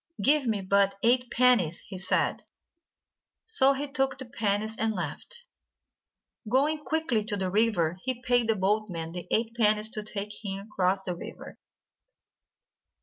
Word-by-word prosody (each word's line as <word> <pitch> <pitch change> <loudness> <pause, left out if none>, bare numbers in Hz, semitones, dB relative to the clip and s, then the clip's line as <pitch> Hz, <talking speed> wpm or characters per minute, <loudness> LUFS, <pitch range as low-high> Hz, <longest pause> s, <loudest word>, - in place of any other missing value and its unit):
"Give 290 -2 +3
me 215 -3 0
but 195 +1 +2
eight 245 +1 +3
pennies," 230 -10 +3
he 190 -2 -8
said. 185 0 0 1.0
So 275 -12 +5
he 285 +2 -3
took 270 -1 0
the 260 - -7
pennies, 215 -2 -1
and 220 0 -1
left. 475 - -5 1.0
Going 295 +5 +2
quickly 275 -6 0
to 210 -2 -2
the 190 -1 -2
river, 190 -5 +1
he 255 +1 -4
paid 245 -2 +2
the 225 - +2
boatman 190 -4 -1
the 175 0 -7
eight 225 0 0
pennies 215 -1 +2
to 215 - -3
take 210 0 -6
him 195 +1 -5
across 190 0 +1
the 180 -2 -3
river. - - -10
215 Hz, 145 wpm, -28 LUFS, 195-250 Hz, 1.0 s, So